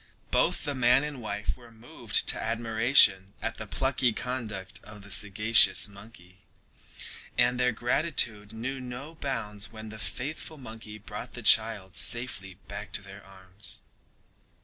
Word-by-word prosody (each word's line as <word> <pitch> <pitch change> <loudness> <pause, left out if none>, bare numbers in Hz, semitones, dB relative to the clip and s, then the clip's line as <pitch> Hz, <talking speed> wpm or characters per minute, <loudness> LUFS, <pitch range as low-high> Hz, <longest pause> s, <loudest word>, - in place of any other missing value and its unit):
Both - - +2
the 145 - -1
man 125 +1 +4
and 150 -4 -5
wife 105 -1 -3
were 120 -2 -16
moved 115 +1 -2
to - - +3
admiration 110 -3 +3
at - - -4
the - - -6
plucky 130 -3 +1
conduct 110 -7 -4
of 105 -1 -12
the 100 - -12
sagacious 105 +3 +5
monkey, 100 -3 -15 1.0
and 120 0 +3
their 125 0 +3
gratitude 120 -4 +1
knew 125 +5 -4
no 125 +5 -7
bounds 115 -9 -3
when 110 -1 -9
the 110 0 -10
faithful 155 +7 -5
monkey 110 -4 -9
brought 110 +3 -8
the 120 - -8
child 105 -4 +4
safely 110 -6 0
back - - -7
to - - +1
their 100 +1 -12
arms. 95 -1 -8
110 Hz, 145 wpm, -28 LUFS, 105-125 Hz, 1.0 s, sagacious